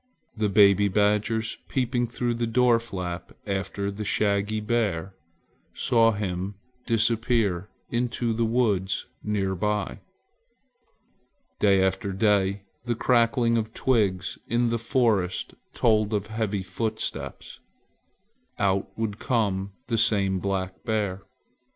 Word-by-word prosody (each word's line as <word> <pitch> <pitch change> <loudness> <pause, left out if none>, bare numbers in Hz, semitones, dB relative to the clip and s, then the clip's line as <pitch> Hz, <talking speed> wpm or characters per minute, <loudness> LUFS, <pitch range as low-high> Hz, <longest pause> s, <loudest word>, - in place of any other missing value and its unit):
The 105 -2 0
baby 100 0 +5
badgers, 105 +3 +1
peeping 125 -2 0
through 120 +1 -1
the 115 0 -1
door 120 0 +4
flap 90 -6 -6
after 100 0 -2
the 105 +2 -5
shaggy 105 0 +1
bear, 105 -5 -1 0.6
saw 115 -1 +4
him 100 -1 -3 0.3
disappear 115 -4 +1 0.2
into 120 -1 0
the 115 +1 0
woods 105 -5 +1 0.2
near 100 -2 0
by. 105 +2 -1 1.6
Day 100 -2 +4
after 95 +1 0
day 100 -1 +2 0.2
the 120 -1 -1
crackling 115 -1 +3
of 110 0 -5
twigs 100 -8 +1
in 120 +1 +1
the 115 0 0
forest 110 -6 +1 0.2
told 110 -2 +2
of 100 -1 -1
heavy 105 -3 -1
footsteps. 110 +4 -4 1.0
Out 95 -1 +1
would 110 -2 -2
come 100 -5 0
the 115 -2 0
same 100 -4 +2
black 95 -1 -3
bear. 105 -4 -1
105 Hz, 115 wpm, -26 LUFS, 100-115 Hz, 1.6 s, baby